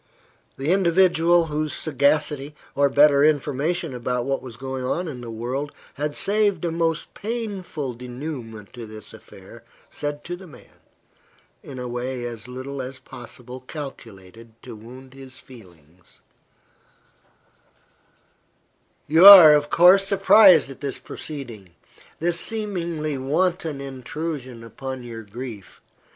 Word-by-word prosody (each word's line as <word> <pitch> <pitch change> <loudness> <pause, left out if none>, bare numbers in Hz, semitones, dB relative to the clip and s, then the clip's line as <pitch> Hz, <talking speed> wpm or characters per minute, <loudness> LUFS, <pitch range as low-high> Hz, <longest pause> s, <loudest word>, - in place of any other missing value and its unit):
The 140 +5 -1
individual 175 -2 +3
whose 155 -1 -3
sagacity, 150 -1 0 0.2
or 140 0 +2
better 145 0 +5
information 150 +2 0
about 125 0 -3
what 135 0 -2
was 120 -3 -10
going 130 0 -5
on 170 +8 -2
in 130 -6 -7
the 120 - -8
world, 125 +6 -4 0.2
had 145 +1 -3
saved 205 -4 +1
a 170 - -1
most 165 -1 -2
painful 200 - -5
denouement 120 -3 -8
to 120 -2 -9
this 110 0 -10
affair, - - -15 0.3
said 145 0 -5
to 175 - -5
the 185 +1 -13
man, 155 - -18 0.8
in 135 - -10
a 125 0 -5
way 125 +1 -4
as 115 -1 -7
little 130 +2 -6
as 130 +1 -7
possible 125 0 -11
calculated 115 - -11
to 120 -3 -9
wound 130 +4 -13
his 135 -1 -13
feelings 90 - -18 2.8
"You 160 +4 +4
are, 180 -7 +12
of 145 0 +1
course, 185 +3 +6
surprised 195 -6 +6
at 135 - -13
this 140 -2 -4
proceeding 115 - -9 0.4
this 170 +1 -1
seemingly 170 -10 -3
wanton 160 +2 -1
intrusion 135 -1 -6
upon 130 +2 -7
your 115 -2 -8
grief. 110 -1 -9
140 Hz, 125 wpm, -23 LUFS, 125-165 Hz, 2.8 s, are